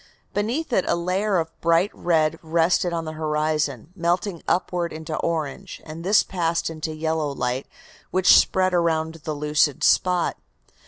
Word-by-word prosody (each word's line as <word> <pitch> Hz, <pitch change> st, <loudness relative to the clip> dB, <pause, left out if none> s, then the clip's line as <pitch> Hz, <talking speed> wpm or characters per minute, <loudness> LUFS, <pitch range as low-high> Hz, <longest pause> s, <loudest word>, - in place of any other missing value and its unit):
Beneath 240 Hz, +8 st, -2 dB
it 190 Hz, -, +3 dB
a -, -, +2 dB
layer 185 Hz, +4 st, 0 dB
of 165 Hz, -1 st, -2 dB
bright 170 Hz, +4 st, +3 dB
red 160 Hz, -2 st, +1 dB
rested 170 Hz, +2 st, +1 dB
on 165 Hz, -1 st, -3 dB
the 155 Hz, -, -4 dB
horizon, 155 Hz, -3 st, -1 dB
melting 175 Hz, 0 st, -1 dB
upward 175 Hz, -1 st, 0 dB
into 155 Hz, 0 st, -5 dB
orange, 165 Hz, +3 st, -3 dB
and 160 Hz, +1 st, -8 dB
this 200 Hz, +3 st, +4 dB
passed 170 Hz, -2 st, -1 dB
into 155 Hz, 0 st, -5 dB
yellow 160 Hz, -1 st, -1 dB
light, 125 Hz, 0 st, -2 dB, 0.4 s
which 185 Hz, 0 st, +5 dB
spread 185 Hz, -1 st, +3 dB
around 160 Hz, -2 st, +1 dB
the 155 Hz, -, -2 dB
lucid 150 Hz, -1 st, +1 dB
spot. 180 Hz, -2 st, +2 dB
165 Hz, 150 wpm, -23 LUFS, 155-180 Hz, 0.4 s, which